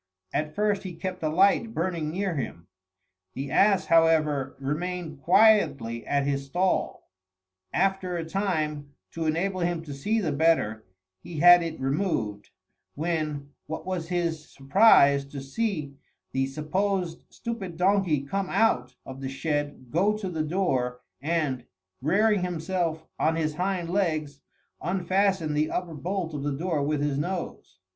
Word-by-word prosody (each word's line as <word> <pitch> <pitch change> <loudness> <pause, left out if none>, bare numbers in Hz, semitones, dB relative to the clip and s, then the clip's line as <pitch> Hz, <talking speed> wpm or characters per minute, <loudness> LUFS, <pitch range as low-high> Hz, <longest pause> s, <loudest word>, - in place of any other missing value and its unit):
At 155 +1 -2
first 210 -1 +1
he 185 -4 -7
kept 185 +2 -5
a 155 - 0
light 200 +7 +3
burning 165 -3 -1
near 185 +3 -1
him. 85 - -5 0.7
The 135 +1 -4
ass, 195 -2 +4
however, 155 -5 +3
remained 155 +2 -3
quietly 150 - +3
at 140 -1 +1
his 140 -1 -1
stall. 180 +6 -1 0.6
After 190 -1 0
a 165 - -3
time, 155 -7 -2 0.2
to 165 -1 -3
enable 185 +4 0
him 170 -1 -1
to 145 -3 -7
see 210 +12 0
the 170 -8 -1
better, 140 - +1 0.3
he 165 - -8
had 175 +2 +8
it 165 -1 -4
removed, 135 - -1 0.5
when 150 -3 -2 0.2
what 160 - -5
was 180 -3 -3
his 170 -3 -2
surprise 140 -2 +5
to 140 0 -8
see 150 0 -2 0.4
the 135 0 0
supposed 175 +4 -1
stupid 210 -8 -6
donkey 180 -6 +2
come 195 +6 -2
out 225 0 +1
of 135 0 -9
the 135 - -3
shed, 145 -3 -3
go 200 +6 +2
to 200 -3 -4
the 160 -2 -2
door, 135 -7 -1 0.2
and, 145 -5 -1 0.4
rearing 200 +7 +3
himself 170 -2 -2
on 160 - +2
his 155 -2 -1
hind 180 +1 -1
legs, 155 -7 -1 0.4
unfasten 185 -1 +1
the 150 +1 +1
upper 180 -2 -3
bolt 170 +2 -3
of 145 - -4
the 140 -1 -2
door 165 -2 -1
with 145 +1 0
his 145 -1 0
nose. 180 +3 -4
165 Hz, 145 wpm, -27 LUFS, 145-185 Hz, 0.7 s, had